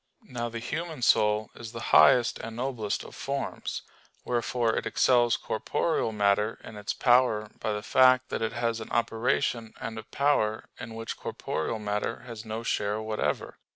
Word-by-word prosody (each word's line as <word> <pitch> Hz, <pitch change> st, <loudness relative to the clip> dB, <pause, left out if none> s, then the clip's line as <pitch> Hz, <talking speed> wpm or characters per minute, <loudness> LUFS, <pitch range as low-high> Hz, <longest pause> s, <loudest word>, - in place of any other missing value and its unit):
Now 120 Hz, -1 st, -4 dB
the 115 Hz, -, -6 dB
human 150 Hz, +3 st, -4 dB
soul 105 Hz, -1 st, +3 dB
is 115 Hz, 0 st, -9 dB
the 115 Hz, -, -5 dB
highest 120 Hz, -2 st, +6 dB
and 115 Hz, 0 st, -7 dB
noblest 120 Hz, -4 st, -2 dB
of -, -, -11 dB
forms. 140 Hz, 0 st, -4 dB, 0.4 s
Wherefore 120 Hz, -1 st, 0 dB
it -, -, -2 dB
excels 120 Hz, -2 st, +3 dB
corporeal 115 Hz, +3 st, -1 dB
matter 105 Hz, +1 st, +2 dB
in 110 Hz, -, -10 dB
its 105 Hz, 0 st, -3 dB
power 120 Hz, -4 st, +3 dB
by 110 Hz, -, -1 dB
the 105 Hz, 0 st, -4 dB
fact 130 Hz, +1 st, +5 dB
that -, -, -3 dB
it 110 Hz, -, -1 dB
has 115 Hz, -1 st, -1 dB
an 110 Hz, -, -8 dB
operation 115 Hz, 0 st, 0 dB
and 110 Hz, 0 st, -5 dB
a -, -, -8 dB
power 125 Hz, -7 st, +1 dB
in 110 Hz, 0 st, -7 dB
which 115 Hz, 0 st, -5 dB
corporeal 80 Hz, +8 st, -3 dB
matter 105 Hz, +2 st, -2 dB
has 115 Hz, -3 st, -9 dB
no 110 Hz, +1 st, -4 dB
share 105 Hz, -2 st, 0 dB
whatever. 110 Hz, 0 st, -2 dB
115 Hz, 165 wpm, -28 LUFS, 110-125 Hz, 0.4 s, highest